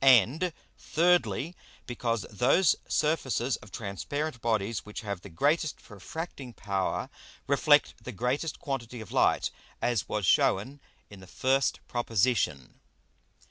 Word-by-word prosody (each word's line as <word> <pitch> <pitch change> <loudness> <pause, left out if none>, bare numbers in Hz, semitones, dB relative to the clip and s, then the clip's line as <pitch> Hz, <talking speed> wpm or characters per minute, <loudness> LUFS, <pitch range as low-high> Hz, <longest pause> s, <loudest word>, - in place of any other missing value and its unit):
And, 135 +7 +5 0.3
Thirdly, 175 -1 +2 0.3
because 115 -3 -2
those 135 - +4
Surfaces 135 -5 +1
of 105 - -15
transparent 125 +8 -4
Bodies 110 -2 0
which 105 - -7
have 100 -4 -4
the 100 - -10
greatest 145 - +1
refracting 130 - -7
power, 95 -4 -2 0.4
reflect - - +3
the - - -5
greatest 130 - -1
quantity 125 -5 -4
of 110 - -9
Light, - - +2 0.3
as 120 -5 0
was 105 -3 -1
shewn 120 +10 +2 0.3
in 100 - -11
the 95 - -13
first 135 +6 +1
Proposition. 115 - 0
120 Hz, 120 wpm, -29 LUFS, 105-145 Hz, 0.4 s, And